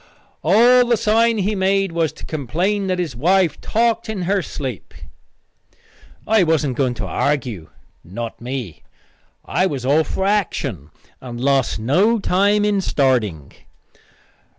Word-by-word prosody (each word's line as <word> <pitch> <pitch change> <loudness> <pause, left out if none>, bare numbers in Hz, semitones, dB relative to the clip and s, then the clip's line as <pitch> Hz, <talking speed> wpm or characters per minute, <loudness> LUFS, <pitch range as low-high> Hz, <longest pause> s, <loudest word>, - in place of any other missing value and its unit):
"All 240 +8 +5
the 235 -1 +2
sign 230 +1 +2
he 205 +1 0
made 195 -1 +1
was 165 -2 0
to - - -11
complain 175 - -2
that 185 -1 0
his 170 -8 -3
wife 175 +6 +1
talked 230 0 0
in 205 -4 -3
her 195 +2 +1
sleep." 130 - -7 1.3
I 220 -1 +4
wasn't 160 -6 +1
going 125 -2 0
to 110 -3 -5
argue 120 - -2 0.3
not 115 +7 -7
me. 120 - -6 0.6
I 180 +7 +1
was 135 -7 -4
all 150 +4 +3
for 190 - -3
action, 140 - -1 0.3
and 120 -2 -8
lost 135 0 +1
no 180 - +2
time 205 +1 +2
in 205 -2 +1
starting. 115 - 0
165 Hz, 135 wpm, -20 LUFS, 130-205 Hz, 1.3 s, All